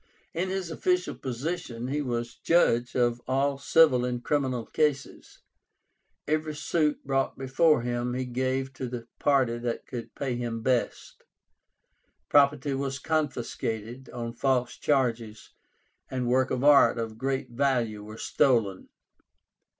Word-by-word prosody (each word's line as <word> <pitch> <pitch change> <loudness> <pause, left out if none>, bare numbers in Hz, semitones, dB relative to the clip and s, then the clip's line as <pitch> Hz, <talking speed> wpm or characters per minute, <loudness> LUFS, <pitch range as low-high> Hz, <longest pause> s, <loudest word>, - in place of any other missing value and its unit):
In 180 +3 -1
his 190 -3 -3
official 180 +2 0
position, 130 -2 -4
he 145 +2 -1
was 120 -3 -3
judge 125 -8 +2
of 120 -1 +1
all 135 +1 +1
civil 140 -4 +4
and 125 -1 -2
criminal 130 -4 0
cases. 150 -3 -2 0.8
Every 155 0 -1
suit 150 +1 0
brought 135 -1 0
before 135 +1 +2
him 120 0 -2
he 130 0 -2
gave 130 +2 -2
to 135 -1 -5
the 120 -1 -6
party 130 -5 +2
that 120 -1 -3
could 120 -3 -7
pay 135 -3 -2
him 115 -2 -4
best. 125 -1 -1 1.1
Property 140 -1 +4
was 135 0 -2
confiscated 125 -5 -3
on 115 -1 -5
false 125 -1 0
charges, 115 -6 -1 0.6
and 130 -2 -2
works 130 +1 +2
of 125 - -1
art 145 -3 +6
of 115 -1 -4
great 135 -1 -2
value 120 -5 0
were 110 +1 -10
stolen. 115 -9 +1
130 Hz, 130 wpm, -27 LUFS, 120-140 Hz, 1.1 s, art